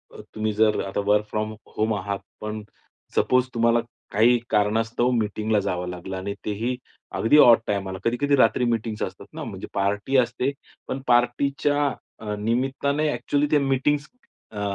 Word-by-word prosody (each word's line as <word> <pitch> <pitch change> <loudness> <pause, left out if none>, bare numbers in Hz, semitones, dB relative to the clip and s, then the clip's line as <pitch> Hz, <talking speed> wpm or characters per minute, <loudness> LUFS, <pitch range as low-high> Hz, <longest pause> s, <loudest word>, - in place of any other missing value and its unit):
अ, - - -9
तुम्ही 110 0 -1
जर 110 0 +3
आता 95 - -3
वर्क 105 +1 +3
फ्रॉम 110 0 -2 0.2
होम 110 0 +1
आहात. 100 0 -3 0.2
पण 105 0 -4 0.5
सपोज 125 0 +3
तुम्हाला 115 0 +3 0.3
काही 115 +4 +5
कारणास्तव 115 +3 +1
मीटिंगला 110 -2 0
जावं 90 -2 -2
लागलं 90 +1 -6
आणि 100 +2 -4
तेही 115 +5 -2 0.4
अगदी 115 +7 +4
ऑड 120 -5 +8
टाईमाला, 95 -2 -2
कधी-कधी 140 +5 +2
रात्री 125 -2 +3
मीटिंग्स 115 -2 -1
असतात - - -6
ना - - -6
म्हणजे - - -7
पार्टी 105 +7 0
असते. 125 +2 +1 0.4
पण 135 - -3
पार्टीच्या 140 +4 +2 0.4
अ, 105 -1 -3
निमित्ताने 135 +6 0
ॲक्च्युअली 145 0 0
त्या 150 - +5
मीटिंग्स 140 +2 +1 0.4
अ, 105 -2 -5
115 Hz, 150 wpm, -24 LUFS, 105-125 Hz, 0.5 s, ऑड